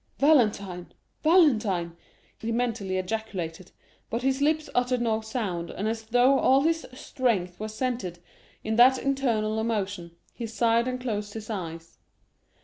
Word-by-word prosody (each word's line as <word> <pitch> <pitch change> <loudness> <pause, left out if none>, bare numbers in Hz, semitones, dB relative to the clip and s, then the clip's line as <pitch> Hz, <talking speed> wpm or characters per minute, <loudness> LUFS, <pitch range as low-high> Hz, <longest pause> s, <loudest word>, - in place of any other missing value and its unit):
"Valentine, 210 - +2 0.3
Valentine!" 215 - +3 0.4
he 225 - -3
mentally 225 -5 -1
ejaculated; 185 -4 -4 0.4
but 230 +2 -3
his 270 +1 +1
lips 310 +1 +1
uttered 250 0 +1
no 225 -2 0
sound, 205 -7 -3
and 205 - -3
as 225 0 -3
though 245 +4 +4
all 265 +1 +4
his 325 +2 0
strength 230 -9 -2
were 215 - -3
centred 215 -5 -3 0.5
in 220 0 -1
that 255 +2 +7
internal 235 -6 0
emotion, 200 -6 -3 0.2
he 235 - -5
sighed 230 +1 +2
and 255 0 -2
closed 210 -4 -3
his 220 0 -6
eyes. 165 -4 -6
225 Hz, 140 wpm, -27 LUFS, 195-255 Hz, 0.5 s, that